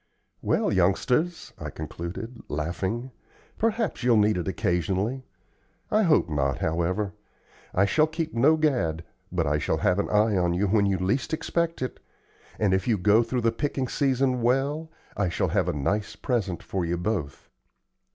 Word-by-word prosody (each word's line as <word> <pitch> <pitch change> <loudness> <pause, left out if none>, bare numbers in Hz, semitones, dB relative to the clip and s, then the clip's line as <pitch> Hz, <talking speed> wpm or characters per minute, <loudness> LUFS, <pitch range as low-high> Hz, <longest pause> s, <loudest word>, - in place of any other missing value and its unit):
"Well, - - +1
youngsters," 125 - +1
I - - -5
concluded, 85 +10 -7
laughing, 95 - -3 0.5
"perhaps 225 -1 0
you'll 120 -2 +4
need 105 0 +4
it 90 -2 -3
occasionally. 95 +8 -1 0.6
I 215 0 +4
hope 165 - +4
not, 70 -4 0
however. 90 +5 -1 0.6
I 100 - +3
shall 155 +10 +3
keep 160 0 -4
no 145 +7 +4
gad, 120 - 0 0.3
but - - 0
I 75 +1 +1
shall - - 0
have 90 +2 +2
an - - -1
eye 105 0 +3
on 90 -2 +1
you 95 +3 +1
when 100 0 +3
you 95 -1 +1
least 105 - 0
expect 165 -2 -1
it; 130 - -5 0.6
and 100 -3 +2
if 95 0 0
you 115 -3 +3
go 105 +4 +4
through 120 +2 -1
the 115 0 +2
picking 135 +1 -2
season 130 -2 +1
well, 140 +6 +1 0.3
I 100 -3 0
shall 85 - 0
have - - +1
a - - +2
nice 100 +9 -1
present 105 -8 -2
for 95 -2 -2
you 85 +1 -1
both. 85 -6 -3
105 Hz, 165 wpm, -26 LUFS, 90-135 Hz, 0.6 s, you'll